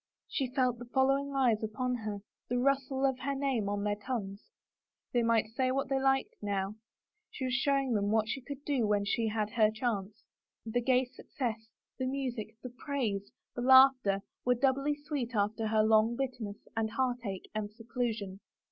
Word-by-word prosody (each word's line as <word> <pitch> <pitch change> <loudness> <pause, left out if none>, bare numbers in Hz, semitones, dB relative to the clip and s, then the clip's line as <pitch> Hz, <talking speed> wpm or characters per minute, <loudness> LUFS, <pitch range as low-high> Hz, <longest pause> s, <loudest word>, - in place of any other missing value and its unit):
She 265 -2 -1
felt 255 -2 +1
the 245 - -7
following 275 +1 +2
eyes 245 -5 +3
upon 250 +4 -1
her, 210 -3 -5 0.3
the 245 - +1
rustle 270 +1 +1
of 265 -2 +1
her 275 +1 -2
name 265 -7 0
on 205 0 -1
their 205 0 +1
tongues. 205 - -5 0.6
They 240 - +3
might 230 -2 +2
say 255 +2 +1
what 270 +1 -1
they 270 -1 +1
liked 270 0 +2
now 200 -1 -1 0.3
— 430 0 -53
she 260 - -5
was 255 - -1
showing 275 -1 +2
them 205 -2 +1
what 220 0 +2
she 265 +5 -3
could 280 +2 -8
do 265 -7 +1
when 205 -1 +2
she 225 +2 0
had 215 -1 -1
her 215 -1 +4
chance! 220 -2 -3 0.4
The 235 +2 0
gay 255 +1 +3
success, 230 -3 -5 0.3
the 260 - 0
music, 250 -5 -3
the 250 - -6
praise, 240 -7 -3 0.2
the 245 - -3
laughter, 255 -6 +6 0.2
were 250 0 +3
doubly 275 +3 +2
sweet 290 -5 -4
after 215 +2 0
her 215 0 +3
long 220 +1 +4
bitterness 245 -6 -4
and 225 -1 0
heartache 235 -5 -2
and 215 -1 -3
seclusion. 225 -4 -3
240 Hz, 180 wpm, -31 LUFS, 215-265 Hz, 0.6 s, laughter